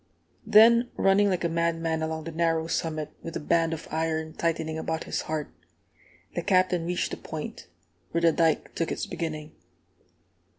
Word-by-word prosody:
Then, 230 +3 +7
running 200 +1 +4
like 185 -2 0
a - - +3
madman 165 -1 0
along 160 0 -3
the 165 - -6
narrow 165 0 +1
summit, 160 -2 -2
with 165 - -7
a - - -1
band 165 +1 +2
of 160 - -5
iron 160 0 -1
tightening 160 -1 -1
about 160 0 -2
his - - -2
heart, 155 -2 -3 0.8
the - - -2
Captain 185 -3 +2
reached 180 0 -1
the - - -4
Point, - - -7 0.4
where 170 - -1
the 170 -1 +5
dike 160 0 +1
took 165 - -2
its - - -2
beginning. 155 -2 -5
165 Hz, 165 wpm, -27 LUFS, 160-170 Hz, 0.8 s, Then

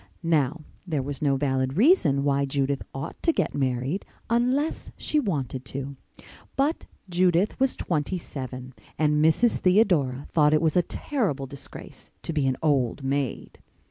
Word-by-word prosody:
Now, 155 -2 +1 0.3
there 150 -6 -1
was 140 0 -5
no 140 -2 +2
valid 130 0 0
reason 190 - +4
why 140 0 +2
Judith 140 0 -1
ought 135 +4 -7
to 335 - +3
get - - -1
married 135 +6 -1 0.3
unless 255 +6 +1
she 305 - 0
wanted 140 - -2
to. 140 +1 -5 0.6
But 285 +4 0 0.2
Judith 180 +3 +2
was 265 0 +2
twenty 170 +2 -1
seven 130 -5 -7 0.2
and 150 -1 +2
Mrs. 190 +9 +4
Theodora 175 - +3
thought 150 -1 +4
it - - +4
was 160 -2 +1
a 180 - +6
terrible 175 - -2
disgrace 135 +1 -11
to 165 - -3
be 145 -3 +1
an 130 - 0
old 140 -3 +1
maid. 135 -1 -2
150 Hz, 150 wpm, -26 LUFS, 135-185 Hz, 0.6 s, a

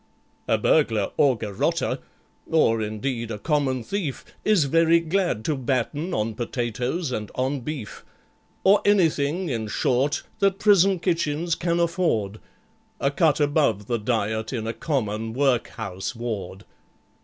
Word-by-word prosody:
"A 110 - +3
burglar 110 -4 +2
or 135 -4 +3
garotter, 105 -3 -1 0.5
or, 115 -8 +3
indeed, 115 +2 -3
a 110 - -4
common 135 -1 0
thief 180 - -4 0.2
Is 210 -7 +4
very 165 +4 +4
glad 165 - -1
to 155 - +1
batten 135 +6 -1
on 110 -3 -1
potatoes 125 - -2
and 105 -4 -3
on 135 +2 -1
beef, 130 -4 -6 0.6
Or 200 +2 +5
anything, 175 -3 +2
in 115 -4 -2
short, 130 +7 0 0.2
that 195 -1 +2
prison 195 -2 +4
kitchens 170 -2 0
can 170 0 0
afford,— 160 - 0 0.6
A 140 - +1
cut 155 0 +2
above 145 -9 +2
the 120 +1 -1
diet 110 0 -1
in 115 -4 -3
a 115 - -2
common 115 -4 -2
workhouse 120 -6 -1
ward. 105 -4 -5
130 Hz, 130 wpm, -24 LUFS, 110-165 Hz, 0.6 s, Or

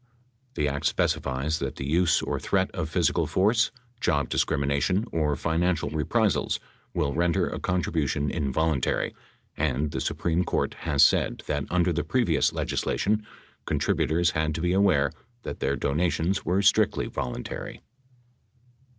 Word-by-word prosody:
The 75 - +1
act 70 0 -1
specifies 70 +4 0
that 70 -1 -3
the 65 - -5
use 85 +2 +3
or - - -2
threat - - 0
of - - -3
physical - - +1
force, 110 +5 +3 0.3
job 75 -10 +1
discrimination 70 +9 +1
or 75 -3 +1
financial 85 +3 0
reprisals 75 -2 +1 0.4
will 70 -1 0
render 85 0 +1
a - - -4
contribution 75 -5 -1
involuntary, 75 -2 0 0.4
and 75 0 0
the - - -3
Supreme 85 +1 0
Court - - -1 0.2
has 70 -1 +6
said - - +1
that 75 -1 -2
under 90 0 +2
the 85 - -1
previous 115 - +2
legislation 105 +2 -1 0.4
contributors 85 +2 +1
had 80 -1 -1
to 80 - -3
be 90 +1 +1
aware 90 -8 +3 0.3
that - - -6
their 70 +1 0
donations 85 +7 0
were 95 +3 +1
strictly 105 +1 +3
voluntary. 60 - -5
80 Hz, 135 wpm, -26 LUFS, 70-90 Hz, 0.4 s, has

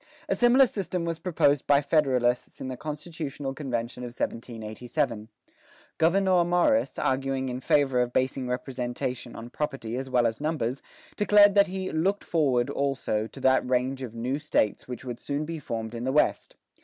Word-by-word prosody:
A - - +1
similar 250 +2 +6
system 185 -6 -3
was 165 -1 -3
proposed 145 -5 +1
by 145 0 +4
Federalists 130 -5 +1
in 130 - -5
the 130 - -4
constitutional 150 -1 -5
convention 125 -4 -4
of 125 - -4
1787. 115 -1 -3 0.7
Gouverneur 185 +2 +4
Morris, 180 +12 +2
arguing 135 0 0
in 125 0 -4
favor 135 -1 +2
of 120 0 -1
basing 130 0 0
representation 125 -1 -4
on 115 +1 -9
property 135 -7 -3
as 130 +1 -4
well 125 -2 +3
as 115 +3 -1
numbers, 145 -5 -1 0.4
declared 205 -1 +6
that 200 0 +5
"he 190 0 -4
looked 190 +6 0
forward, 135 -7 +1
also, 135 -6 -1
to - - -12
that 130 -1 +3
range 130 +1 0
of 120 -3 -6
new 125 +5 -2
States 145 -8 0
which 125 +1 -7
would 120 -2 -5
soon 145 +1 -3
be 165 0 -5
formed 115 -4 -5
in 115 0 -5
the 130 - 0
West. 150 - +1
135 Hz, 170 wpm, -27 LUFS, 125-160 Hz, 0.7 s, similar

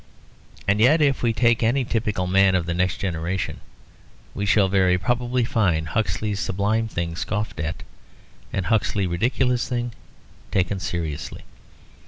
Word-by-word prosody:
And 100 +1 +3
yet 135 +9 +5
if 140 -3 +2
we 120 - +2
take 115 +1 +2
any 120 +3 +2
typical 105 -5 -1
man 95 +1 +4
of 90 -2 +1
the 85 - -2
next 90 +2 0
generation, 90 0 -3 0.7
we 100 - -3
shall 100 -1 +4
very 95 -1 +3
probably 125 +4 0
find 85 -10 +1
Huxley's 105 +1 -1
sublime 105 +4 0
thing 85 -5 -3
scoffed 105 0 -3
at, 80 +2 -4 0.7
and 95 - -2
Huxley's 105 -3 +1
ridiculous 125 +7 0
thing 120 -2 -2 0.6
taken 95 +1 0
seriously. 85 -4 -4
100 Hz, 140 wpm, -23 LUFS, 90-115 Hz, 0.7 s, yet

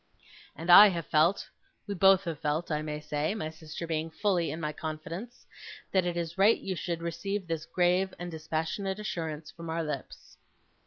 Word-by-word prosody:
And 165 +4 0
I 205 +4 +11
have 170 -4 -2
felt 160 +5 +2 0.4
we 205 - -3
both 195 0 +5
have 165 -5 -4
felt, 155 +3 -1
I 150 0 0
may 150 -1 -4
say; 150 +4 -2
my 155 -8 -4
sister 160 +1 -7
being 160 0 -2
fully 175 0 0
in 160 - -4
my 155 -2 -3
confidence 165 +10 -7 0.5
that 185 -2 +2
it 175 -1 -2
is 170 +1 -4
right 210 +4 +6
you 190 - -4
should 170 -1 -3
receive 185 +4 -3
this 165 -1 -4
grave 180 +1 +2
and 175 0 -6
dispassionate 160 +5 -3
assurance 160 -7 -5
from 165 -1 -9
our 165 +1 -1
lips. 150 -4 -7
170 Hz, 180 wpm, -29 LUFS, 155-190 Hz, 0.5 s, I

